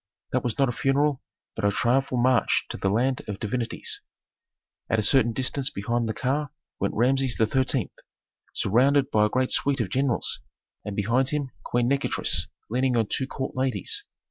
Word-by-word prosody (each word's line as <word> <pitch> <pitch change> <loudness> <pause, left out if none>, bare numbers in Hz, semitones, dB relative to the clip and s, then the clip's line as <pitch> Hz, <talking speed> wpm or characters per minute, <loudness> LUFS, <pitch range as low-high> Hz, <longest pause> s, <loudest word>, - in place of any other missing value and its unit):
That - - 0
was 120 -3 -2
not 135 - +3
a - - 0
funeral, 135 +2 +1 0.3
but 110 - -5
a 100 - +4
triumphal 125 +5 +1
march 125 0 +3
to - - -5
the 95 - 0
land 125 +6 +1
of 100 -2 -4
divinities. 115 +2 -3 0.9
At 115 - +2
a 110 - +1
certain 120 +1 +4
distance 130 +3 -1
behind 115 -1 -1
the - - -1
car 145 +3 -1 0.3
went 100 - -1
Rameses 130 +2 +2
XIII., 130 0 +1 0.6
surrounded 135 +6 +3
by 105 0 +4
a - - -6
great 130 +3 0
suite 140 -1 +1
of 105 -6 -1
generals, 135 -2 0 0.4
and 105 - -5
behind 120 +6 +2
him 145 -3 -2
Queen 120 0 0
Nikotris 140 +1 0 0.2
leaning 125 +1 +1
on 110 -3 +1
two 130 - 0
court 130 0 -4
ladies. 130 -7 -1
125 Hz, 170 wpm, -26 LUFS, 115-135 Hz, 0.9 s, a